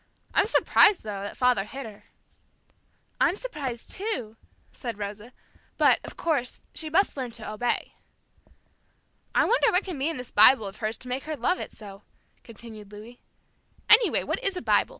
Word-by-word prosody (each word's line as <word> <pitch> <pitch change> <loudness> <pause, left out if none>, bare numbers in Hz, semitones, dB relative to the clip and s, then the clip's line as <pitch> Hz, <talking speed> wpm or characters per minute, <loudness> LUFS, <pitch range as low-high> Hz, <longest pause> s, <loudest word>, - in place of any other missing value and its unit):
I'm - - +3
surprised, 420 -3 +4
though, 205 -2 -5
that 200 - -7
father 250 -6 +3
hit 265 +6 -8
her." 210 -2 -12 1.1
"I'm - - +3
surprised 280 - -5
too," 265 - -3 0.4
said 235 -5 -6
Rosa, 210 +3 -7 0.5
"but, - - +4
of - - -10
course, 285 -7 -1
she 315 - -3
must 380 +6 +2
learn 260 -3 -4
to 225 -2 -7
obey." 215 +3 -2 1.4
"I - - +4
wonder - - +3
what 360 +3 +2
can 355 -7 -5
be 280 +4 0
in 330 - -4
this 250 -1 -8
Bible 220 +2 +6
of 195 +1 -8
hers 220 0 -3
to 255 - -13
make 255 +2 -4
her 310 -1 -4
love 355 +10 0
it - - -6
so," 200 -2 -12 0.4
continued 220 -2 -12
Louis. 220 +4 -12 0.7
"Any 445 +2 +8
way, - - 0
what - - -3
is 390 -2 0
a - - -4
Bible? - - +3
245 Hz, 175 wpm, -26 LUFS, 215-320 Hz, 1.4 s, Any